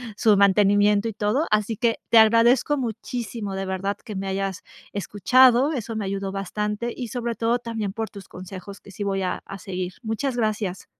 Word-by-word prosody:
su 210 Hz, -1 st, +4 dB
mantenimiento 205 Hz, +2 st, +4 dB
y -, -, -6 dB
todo, 215 Hz, +9 st, 0 dB
así 215 Hz, +1 st, +1 dB
que 230 Hz, +1 st, 0 dB
te 230 Hz, -, +6 dB
agradezco 230 Hz, +6 st, +4 dB
muchísimo, 230 Hz, -3 st, -4 dB
de 195 Hz, 0 st, -3 dB
verdad, 190 Hz, +1 st, -2 dB
que 210 Hz, -, -9 dB
me 195 Hz, 0 st, -3 dB
hayas 195 Hz, -1 st, -3 dB, 0.3 s
escuchado. 250 Hz, -, +4 dB
Eso 225 Hz, -3 st, -4 dB
me 210 Hz, -, -2 dB
ayudó 195 Hz, 0 st, -3 dB
bastante 210 Hz, +4 st, -3 dB
y, 245 Hz, -3 st, -5 dB
sobre 235 Hz, -2 st, -3 dB
todo, 230 Hz, +3 st, +1 dB
también 225 Hz, -4 st, -4 dB
por 220 Hz, +2 st, -4 dB
tus 200 Hz, -2 st, -12 dB
consejos, 185 Hz, +2 st, -9 dB
que 200 Hz, -, -15 dB
sí 200 Hz, +2 st, -5 dB
voy 195 Hz, -1 st, -1 dB
a 180 Hz, -, -2 dB
a 195 Hz, -, -8 dB
seguir. 185 Hz, -2 st, -5 dB
Muchas 240 Hz, +3 st, -2 dB
gracias. 210 Hz, -4 st, -2 dB
210 Hz, 185 wpm, -24 LUFS, 195-230 Hz, 0.3 s, te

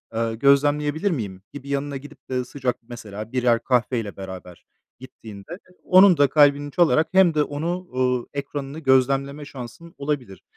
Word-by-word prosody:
ııı, 115 Hz, 0 st, -1 dB
gözlemleyebilir 145 Hz, -, +2 dB
miyim?" 100 Hz, -, -4 dB
gibi 140 Hz, -1 st, -9 dB
yanına 140 Hz, 0 st, -2 dB
gidip 145 Hz, 0 st, -14 dB
de 125 Hz, -1 st, -2 dB
sıcak 130 Hz, -1 st, -3 dB
mesela 110 Hz, -2 st, -8 dB
birer 120 Hz, -2 st, +2 dB
kahveyle 115 Hz, -4 st, -1 dB
beraber 95 Hz, -2 st, -10 dB, 0.3 s
gittiğinde, 110 Hz, -, -11 dB
e, 185 Hz, 0 st, -13 dB
onun 185 Hz, -2 st, +6 dB
da 145 Hz, -1 st, +4 dB
kalbini 145 Hz, -1 st, +3 dB
çalarak 160 Hz, -1 st, +3 dB
hem 190 Hz, -3 st, +5 dB
de 150 Hz, -1 st, +2 dB
onu, 165 Hz, +5 st, -3 dB
uuu, 125 Hz, -1 st, 0 dB
ekranını 140 Hz, +1 st, -5 dB
gözlemleme 140 Hz, +1 st, +1 dB
şansın 140 Hz, +6 st, -10 dB
olabilir. 140 Hz, -, -4 dB
140 Hz, 150 wpm, -23 LUFS, 120-145 Hz, 0.3 s, onun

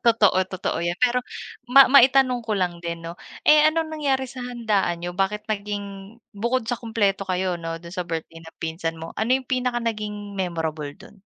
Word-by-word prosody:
Totoo, 225 Hz, -5 st, +4 dB
totoo 185 Hz, -1 st, -3 dB
'yan, 170 Hz, +1 st, -1 dB
pero 250 Hz, 0 st, +3 dB, 0.5 s
ma 275 Hz, +2 st, +9 dB
maitanong 260 Hz, -2 st, +6 dB
ko 220 Hz, -1 st, -4 dB
lang 175 Hz, -2 st, -1 dB
din 170 Hz, -1 st, -5 dB
'no. 165 Hz, -, -5 dB, 0.3 s
Eh, 300 Hz, 0 st, +7 dB
anong 315 Hz, 0 st, -1 dB
nangyari 275 Hz, -4 st, 0 dB
sa 255 Hz, 0 st, -9 dB
handaan 220 Hz, -8 st, -1 dB
niyo, 175 Hz, -, -3 dB
bakit 195 Hz, +3 st, -1 dB
naging 200 Hz, 0 st, -5 dB, 0.2 s
bukod 235 Hz, +4 st, -1 dB
sa 235 Hz, +1 st, -3 dB
kumpleto 200 Hz, -4 st, 0 dB
kayo 185 Hz, -1 st, 0 dB
'no 165 Hz, 0 st, -4 dB
do'n 170 Hz, +1 st, -11 dB
sa 180 Hz, -2 st, -4 dB
birthday 165 Hz, 0 st, -5 dB
ng 160 Hz, 0 st, -14 dB
pinsan 165 Hz, 0 st, -3 dB
mo, 165 Hz, 0 st, -8 dB
ano 220 Hz, +2 st, -1 dB
'yung 265 Hz, -1 st, -8 dB
pinaka 250 Hz, -1 st, 0 dB
naging 210 Hz, -2 st, -4 dB
memorable 160 Hz, -5 st, -2 dB
do'n? -, -, -16 dB
205 Hz, 185 wpm, -24 LUFS, 175-245 Hz, 0.5 s, ma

